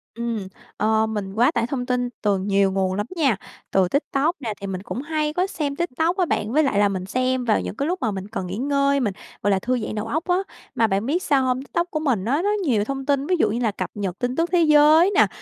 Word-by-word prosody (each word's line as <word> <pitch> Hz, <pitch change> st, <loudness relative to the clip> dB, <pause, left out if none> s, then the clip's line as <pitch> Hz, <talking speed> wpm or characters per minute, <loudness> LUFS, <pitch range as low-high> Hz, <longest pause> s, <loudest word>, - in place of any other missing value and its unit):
Ừm, 230 Hz, -4 st, -3 dB, 0.3 s
ờ, 220 Hz, +1 st, +2 dB
mình 205 Hz, -3 st, -4 dB
quá 235 Hz, +4 st, +3 dB
tải 235 Hz, 0 st, 0 dB
thông 250 Hz, -2 st, -3 dB
tin 250 Hz, -1 st, 0 dB
từ 205 Hz, -2 st, +2 dB
nhiều 195 Hz, 0 st, +2 dB
nguồn 190 Hz, -1 st, 0 dB
lắm 205 Hz, +2 st, -2 dB
nha. 275 Hz, -, +2 dB, 0.4 s
Từ 190 Hz, -2 st, +3 dB
TikTok 285 Hz, -, 0 dB
nè, 225 Hz, -5 st, -3 dB
thì 200 Hz, -, -4 dB
mình 185 Hz, -1 st, -4 dB
cũng 205 Hz, +6 st, -5 dB
hay 305 Hz, 0 st, -1 dB
có 365 Hz, +3 st, +1 dB
xem 290 Hz, -7 st, -3 dB
TikTok 340 Hz, +3 st, -1 dB
á 365 Hz, -, +3 dB
bạn, 215 Hz, -7 st, -1 dB
với 305 Hz, +3 st, +3 dB
lại 210 Hz, -7 st, +1 dB
là 205 Hz, -1 st, +4 dB
mình 185 Hz, -1 st, -3 dB
xem 255 Hz, +3 st, 0 dB
vào 220 Hz, -, +2 dB
những -, -, -5 dB
cái 280 Hz, +4 st, -1 dB
lúc 360 Hz, +1 st, -2 dB
mà 220 Hz, -, 0 dB
mình 195 Hz, 0 st, -5 dB
cần 200 Hz, -4 st, -4 dB
nghỉ 190 Hz, +4 st, -5 dB
ngơi, 280 Hz, +1 st, +2 dB
mình, 210 Hz, -6 st, 0 dB, 0.3 s
gọi 205 Hz, -, +3 dB
là, 190 Hz, -, +2 dB
thư 250 Hz, +4 st, 0 dB
giãn 215 Hz, -, -4 dB
đầu 215 Hz, +1 st, -3 dB
óc 315 Hz, +7 st, -1 dB
á. 355 Hz, -, +3 dB, 0.4 s
Mà 225 Hz, -2 st, +3 dB
bạn 195 Hz, +3 st, 0 dB
biết 335 Hz, +7 st, 0 dB
sao 275 Hz, -2 st, +2 dB
hông? 255 Hz, 0 st, 0 dB
TikTok 345 Hz, +4 st, -2 dB
của 310 Hz, -, -1 dB
mình 245 Hz, -11 st, 0 dB
á, 280 Hz, +7 st, +1 dB
nó 410 Hz, -, +1 dB
nhiều 225 Hz, -9 st, +2 dB
thông 270 Hz, +3 st, -4 dB
tin, 280 Hz, -1 st, +1 dB
ví 365 Hz, -, +2 dB
dụ 215 Hz, -, +3 dB
như 230 Hz, +3 st, -1 dB
là 225 Hz, -4 st, +1 dB
cập -, -, -4 dB
nhật 195 Hz, -3 st, -4 dB
tin 245 Hz, +1 st, -1 dB
tức 335 Hz, +1 st, 0 dB
thế 350 Hz, -2 st, +4 dB
giới 310 Hz, +4 st, +6 dB
nè, -, -, +6 dB
245 Hz, 275 wpm, -23 LUFS, 205-295 Hz, 0.4 s, giới